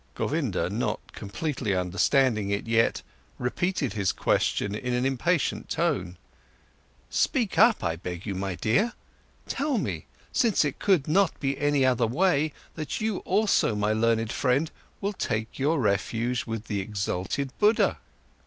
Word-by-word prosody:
Govinda, - - -1
not - - -1
completely 110 0 -3
understanding 105 +4 +2
it 100 0 -1
yet, 115 0 +2 0.3
repeated 150 +2 -1
his 100 -4 +1
question 100 - 0
in 125 +3 -2
an 125 +1 0
impatient 140 +5 0
tone: 95 - -1 0.9
"Speak 235 -8 +1
up, 225 +1 +5
I 85 -2 -1
beg 90 +1 -6
you, 100 - -2
my 95 0 -3
dear! 125 - +1 0.5
Tell 280 -1 0
me, - - -3 0.3
since 225 -9 +3
it 140 - -3
could 185 -9 +2
not 185 +3 +2
be 135 -1 0
any 145 -2 +2
other 125 -3 +3
way, 155 +3 +2 0.2
that 155 -3 -4
you 215 -3 -1
also, 200 - +2
my 105 +1 +1
learned 115 0 +1
friend, 135 +6 +1 0.3
will 200 +1 -1
take 110 - -3
your 145 +3 +2
refuge 115 +3 0
with 115 -1 -4
the 105 -2 -2
exalted 100 +6 -2
Buddha!" 215 +1 +3
125 Hz, 145 wpm, -27 LUFS, 105-165 Hz, 0.9 s, up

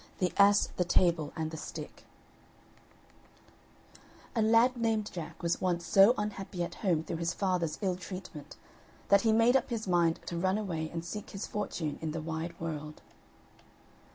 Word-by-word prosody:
THE 180 -2 0
ASS, 200 0 +5
THE 180 - +3
TABLE, 170 -3 +2
AND 160 -1 -3
THE 160 - -6
STICK - - -8 2.3
A 225 - +2
lad 230 +3 +4
named 225 -3 0
Jack 165 -2 -7
was 170 0 0
once 175 -2 0
so 200 +5 +6
unhappy 195 -3 -3
at 170 - -5
home 170 -6 +1
through 165 - -4
his 170 +1 -2
father's 180 -5 0
ill 185 -2 0
treatment, 185 -4 -8 0.5
that 200 0 +6
he 225 - +3
made 230 +3 +4
up 270 - +2
his 225 -4 -3
mind 170 -2 +2
to 170 - -4
run 190 +3 +1
away 165 -7 -3
and 165 0 -5
seek 210 +3 -6
his 195 - -5
fortune 175 -7 -3
in 155 -1 -3
the 165 - -3
wide 165 +2 -5
world. 155 -2 -6
180 Hz, 165 wpm, -31 LUFS, 165-205 Hz, 2.3 s, so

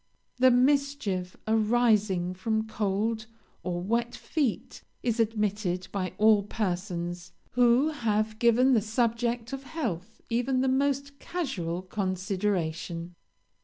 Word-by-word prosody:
"The 255 +1 +6
mischief 250 -8 +1
arising 215 -5 +2
from 220 +4 -1
cold 220 +1 -1 0.3
or 175 -1 -2
wet 235 +4 0
feet 285 -8 -2 0.2
is 235 -1 0
admitted 210 -4 0
by 185 -2 -2
all 215 -1 +5
persons 180 -4 -3 0.2
who 245 +4 +4
have 220 -6 -1
given 245 +3 +5
the 225 - +4
subject 235 +2 -1
of 270 - -4
health 225 - -4
even 250 +2 +1
the 265 - +1
most 280 +1 0
casual 185 - -3
consideration. 185 -3 -2
220 Hz, 110 wpm, -28 LUFS, 185-245 Hz, 0.3 s, The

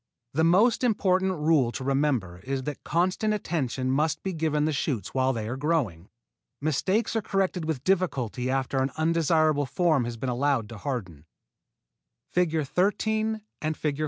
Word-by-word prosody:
The 160 +3 +2
most 205 +10 +4
important 190 -5 +2
rule 150 -6 +2
to 130 - -5
remember 135 -10 0
is 135 +5 -3
that 145 0 -5
constant 185 +6 +1
attention 135 - -2
must 150 +3 0
be 190 - -2
given 155 -2 0
the 155 - 0
shoots 135 -6 -2
while 130 0 +2
they 110 -4 -3
are 120 - -3
growing. 135 - -1 0.5
Mistakes 185 - 0
are 225 - +2
corrected 190 -4 -1
with 155 -5 -3
difficulty 135 - 0
after 135 0 0
an 135 - +1
undesirable 155 -2 +2
form 155 -2 +2
has 120 -1 -5
been 130 - -4
allowed 125 -3 0
to 115 - -9
harden. 95 - -5 1.1
[Illustration: 200 +7 +1 0.3
FIG. 150 -2 -3
150 Hz, 150 wpm, -27 LUFS, 130-180 Hz, 1.1 s, most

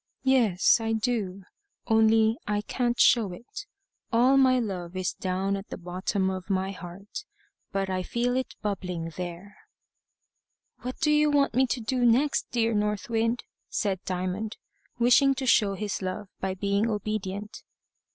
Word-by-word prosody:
"Yes 240 -8 +4
I 225 0 -1
do. 215 -4 -1 0.4
Only 220 0 +4
I 210 0 0
can't 240 +2 -1
show 220 -6 +5
it. 410 - -9 0.4
All 250 +3 +4
my 260 -1 +5
love 185 -7 -3
is 185 -1 -1
down 190 +1 -1
at 195 +1 -7
the - - -6
bottom 185 +2 -2
of 185 +1 -6
my 190 0 0
heart. 190 - -8 0.5
But 195 -1 -1
I 185 -1 -1
feel 240 +6 -1
it 260 0 -2
bubbling 180 -5 -3
there." 180 +3 -7 1.2
"What 255 +1 -6
do 305 -2 +3
you 300 0 +4
want 285 -1 +2
me 260 +1 +3
to 250 - -1
do 245 +2 -1
next, 250 +5 +3
dear 230 -1 +1
North 210 +1 -1
Wind?" 230 +1 +1 0.3
said 195 -4 -1
Diamond, 185 +4 -3 0.4
wishing 250 +3 +5
to 265 0 -3
show 205 -5 +4
his 205 0 -3
love 190 +2 -4
by 190 0 -2
being 200 +3 0
obedient. 210 -1 -4
210 Hz, 150 wpm, -27 LUFS, 190-240 Hz, 1.2 s, show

